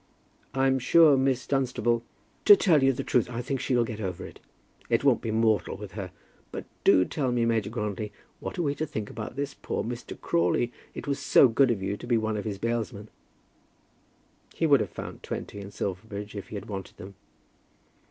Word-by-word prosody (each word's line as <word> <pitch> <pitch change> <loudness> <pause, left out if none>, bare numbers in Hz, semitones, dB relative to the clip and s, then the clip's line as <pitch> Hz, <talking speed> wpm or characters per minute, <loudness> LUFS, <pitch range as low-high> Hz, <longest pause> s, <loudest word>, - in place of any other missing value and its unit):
"I'm 135 0 +3
sure 155 +3 +6
Miss 130 -2 +1
Dunstable 120 -4 +1 0.2
" - - -37
"To 410 - +11
tell 170 - +4
you 135 0 +5
the 125 - -3
truth, 125 -1 +1
I 120 0 -4
think 135 +1 -2
she'll 120 -2 +2
get 115 -2 -5
over 90 -4 -4
it. - - -12 0.5
It - - +2
won't - - +4
be - - -3
mortal 110 -2 +1
with 105 -1 -8
her. 95 -1 -5 0.4
But - - -6 0.2
do 90 - +6
tell 135 -5 -1
me, 120 -1 +1
Major 115 -3 +1
Grantly, 105 -2 -3 0.3
what - - -6
are 175 - 0
we 140 -2 +1
to 155 +2 -3
think 110 -5 -5
about 110 +1 -6
this 140 +1 -3
poor - - -3
Mr. 120 +1 -6
Crawley? 90 +8 +1 0.2
It - - -6
was 140 -1 -1
so 135 0 +6
good 125 +3 +3
of 105 -5 -1
you 100 +1 -2
to - - -9
be 120 -2 +3
one 110 0 -1
of 105 - -3
his 105 -2 -3
bailsmen." 115 -1 -3 1.5
"He - - +1
would 145 -4 +6
have - - -2
found - - -8
twenty 100 - -6
in 100 -1 -7
Silverbridge, 100 +1 -5
if 100 - -6
he - - -8
had 100 - -5
wanted 95 -3 -7
them." 95 +2 -9
115 Hz, 205 wpm, -27 LUFS, 105-135 Hz, 1.5 s, To